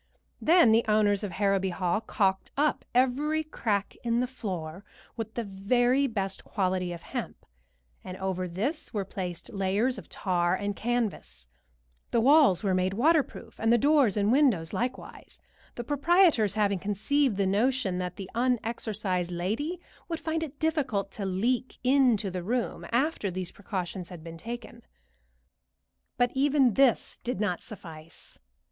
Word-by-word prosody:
Then 330 -7 +6
the 225 +1 +4
owners 210 -1 +3
of 195 -4 -4
Harrowby 195 -1 +1
Hall 180 +2 -1
caulked 195 -3 0
up 300 +1 +1
every 285 +5 +2
crack 210 -9 -2
in 235 0 +1
the 250 - +1
floor 190 -8 -6 0.3
with 225 -2 -6
the 235 - -2
very 245 +7 +2
best 195 -5 -3
quality 185 -3 -1
of 170 -1 -8
hemp, - - -6 0.6
and 185 0 -7
over 185 -1 -2
this 230 - -3
were 200 -2 -1
placed 180 +1 -6
layers 200 +6 0
of - - -14
tar 175 -2 0
and 205 +1 -3
canvas; 215 - -3 0.6
the 235 - +2
walls 270 - +5
were 195 -2 +1
made 185 +1 0
waterproof, 300 +5 +1
and 225 +1 +2
the 240 - +6
doors 280 -5 +3
and 205 +1 +2
windows 240 - +3
likewise, 250 +2 -5 0.4
the 240 - -4
proprietors 290 - +3
having 200 -3 +1
conceived 210 +5 0
the 200 - +2
notion 205 -1 +1
that 180 -1 -4
the 195 - -7
unexorcised 220 -6 -1
lady 220 - -2 0.3
would 330 -1 -3
find 320 0 -2
it 295 -3 -6
difficult 295 -11 -1
to 200 - -5
leak 235 +7 -1
into 250 -7 +3
the 180 0 -4
room 235 +7 -2
after 250 -3 0
these 185 -1 -4
precautions 185 -3 -5
had 175 -3 -10
been 165 0 -8
taken; 235 +3 -8 1.4
but 245 0 +2
even 270 -3 +3
this 265 +1 +2
did 240 -5 -3
not 195 -5 -1
suffice. 165 -7 -12
215 Hz, 150 wpm, -28 LUFS, 190-255 Hz, 1.4 s, Then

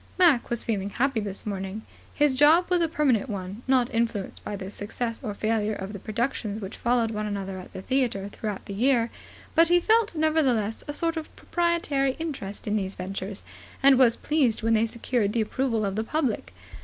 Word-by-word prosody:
Mac 335 -10 +4
was 240 -1 +2
feeling 200 -3 -1
happy 260 +2 0
this 200 -2 -5
morning. 195 +1 -4 0.3
His 290 -3 +2
job 320 +6 +5
was 355 -1 +3
a 335 - +3
permanent 275 -7 +1
one, 195 +1 -5
not 260 -1 +2
influenced 225 -4 -2
by 210 - -4
the 195 0 -6
success 230 +4 -4
or 210 -4 -4
failure 215 0 0
of 195 +1 -6
the 200 - -6
productions 220 0 -2
which 195 -1 -6
followed 235 -2 +1
one 210 -1 -2
another 195 -2 -4
at 185 - -11
the 190 - -8
theatre 240 -7 0
throughout 205 -1 -5
the 200 - -6
year; 235 +2 +2 0.4
but 330 +1 +6
he 350 +1 +5
felt, 440 0 +2
nevertheless, 275 -9 +1
a 290 - -3
sort 330 +2 -1
of 315 - -6
proprietary 335 -6 0
interest 275 -12 -5
in 210 0 0
these 190 -1 -3
ventures, 195 +2 -5 0.4
and 270 -1 +7
was 240 -3 +6
pleased 265 -8 +1
when 225 0 +3
they 225 +1 +3
secured 230 -2 -1
the 230 - +2
approval 230 -1 0
of 195 -1 -2
the 220 - 0
public. 235 - -1
230 Hz, 195 wpm, -26 LUFS, 205-275 Hz, 0.4 s, and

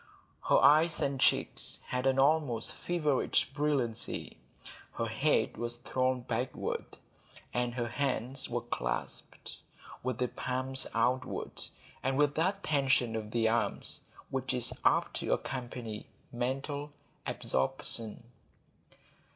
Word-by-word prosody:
Her - - +6
eyes 155 +3 +6
and 135 -1 0
cheeks - - +2
had 125 +1 0
an 135 0 +3
almost 140 -4 +3
feverish 155 -6 +1
brilliancy; 140 -6 -1 0.6
her - - -1
head - - +2
was 120 0 -2
thrown 130 +1 0
backward, 120 +1 -3 0.6
and 120 -1 0
her 120 -2 0
hands 130 0 -1
were - - -1
clasped - - -4 0.4
with 130 -2 -2
the 125 - +1
palms 130 +2 -1
outward, 125 +2 0 0.4
and 135 +1 0
with 145 0 +4
that 190 +6 0
tension 135 -6 +2
of 110 -1 -3
the 115 0 +2
arms 115 +1 -1 0.3
which 130 -1 -1
is 125 - +2
apt - - +3
to - - 0
accompany 120 -4 -4 0.2
mental 135 +4 -2 0.4
absorption. 105 - 0
130 Hz, 115 wpm, -32 LUFS, 120-140 Hz, 0.6 s, Her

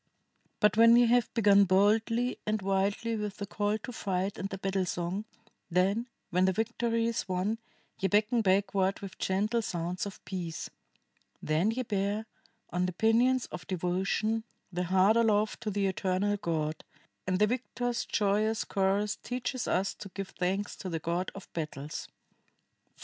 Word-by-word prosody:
"But, 210 0 +3
when 230 +1 +8
ye 240 0 +6
have 240 0 +3
begun 200 -3 +6
boldly 220 +6 +2
and 215 0 +1
wildly 200 +4 0
with 210 -2 -4
the 200 - -4
call 205 +1 -1
to 235 +4 -8
fight 195 -2 -2
and 195 - -3
the 195 - -5
battle 195 0 0
song, 175 +5 -2 0.4
then, 195 +7 +2 0.2
when 180 +1 +3
the 190 - +4
victory 230 +2 0
is 230 -4 -2
won, 190 +5 0 0.4
ye 195 - +2
beckon 215 +4 +3
backward 195 -1 +2
with 195 -2 -8
gentle 210 +5 +1
sounds 180 -1 -3
of 200 - -11
peace. 170 -4 -5 0.7
Then 155 +7 +1
ye 250 +3 -1
bear, 205 0 -1 0.5
on 180 +1 +1
the 180 - -3
pinions 235 +5 +3
of - - -7
devotion, 190 +5 0 0.3
the 180 +1 -1
heart 190 +5 +4
aloft 215 -2 +2
to 220 - -2
the 200 -1 0
eternal 190 +2 0
God, 160 -5 -2 0.4
and 185 -1 +1
the 210 - +5
victors' 245 +1 -2
joyous 215 +1 +1
chorus 200 +1 0
teaches 250 0 -3
us 190 +2 +1
to 195 - -10
give 195 -1 -4
thanks 190 +3 -2
to 185 - -5
the 165 - -2
God 170 +3 -2
of 195 - -9
Battles." 150 -2 -5 0.8
[IV. - - -44
200 Hz, 160 wpm, -30 LUFS, 185-220 Hz, 0.8 s, when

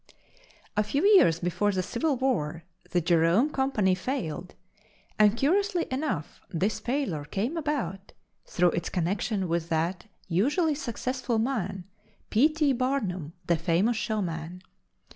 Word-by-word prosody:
A 210 - +3
few 275 +8 -1
years 380 - +6
before 180 +4 0
the 185 -2 -1
Civil 280 - 0
War, 170 - -1 0.3
the 175 - +1
Jerome 170 - +3
Company 265 -10 +1
failed 185 - -4 0.6
and, 210 +1 +5
curiously 360 +5 +2
enough, 260 - -3
this 195 +6 -1
failure 245 - -2
came 200 - -2
about 260 - -3 0.3
through 175 -1 +2
its 170 - -2
connection 190 +2 -1
with 170 0 -1
that 170 +3 -1 0.2
usually 290 - +2
successful 255 -3 -2
man, 210 -6 -1 0.5
P. 255 +8 +5
T. 305 -3 +1
Barnum, 210 - -1
the 170 -1 +2
famous 175 +8 +1
showman. 180 -5 -3
205 Hz, 125 wpm, -27 LUFS, 175-265 Hz, 0.6 s, years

